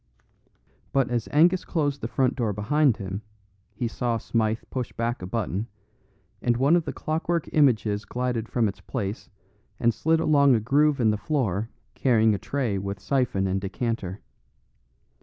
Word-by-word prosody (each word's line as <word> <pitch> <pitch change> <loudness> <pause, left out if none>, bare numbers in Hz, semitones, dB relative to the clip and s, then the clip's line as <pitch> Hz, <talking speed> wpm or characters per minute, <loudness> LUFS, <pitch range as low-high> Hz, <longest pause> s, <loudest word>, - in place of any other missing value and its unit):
But 135 -3 +2
as 120 -3 -1
Angus 175 +5 +4
closed 145 -4 -1
the - - -2
front 130 +1 +1
door 115 -5 -1
behind 125 +5 +2
him 100 -1 -5 0.5
he 120 - -1
saw 115 0 -1
Smythe 110 -1 -1
push 125 -3 -3
back 115 -1 -2
a 90 - -5
button, 105 0 -2 0.7
and 120 -1 +1
one 140 +6 +4
of 170 -2 +1
the - - -3
clockwork 165 +1 -2
images 110 -8 +3
glided 125 -2 -2
from 115 -3 +1
its 100 - -6
place 105 -5 -4 0.5
and 120 0 +3
slid 160 +10 +1
along 140 -4 +4
a - - +2
groove 140 +6 +2
in 110 -3 +4
the 105 - -1
floor 110 - -1 0.2
carrying 110 -4 +3
a 100 - -2
tray 125 -8 -1
with 100 +1 -4
syphon 125 -4 0
and 95 +1 0
decanter. 100 -1 -3
120 Hz, 160 wpm, -25 LUFS, 105-140 Hz, 0.7 s, Angus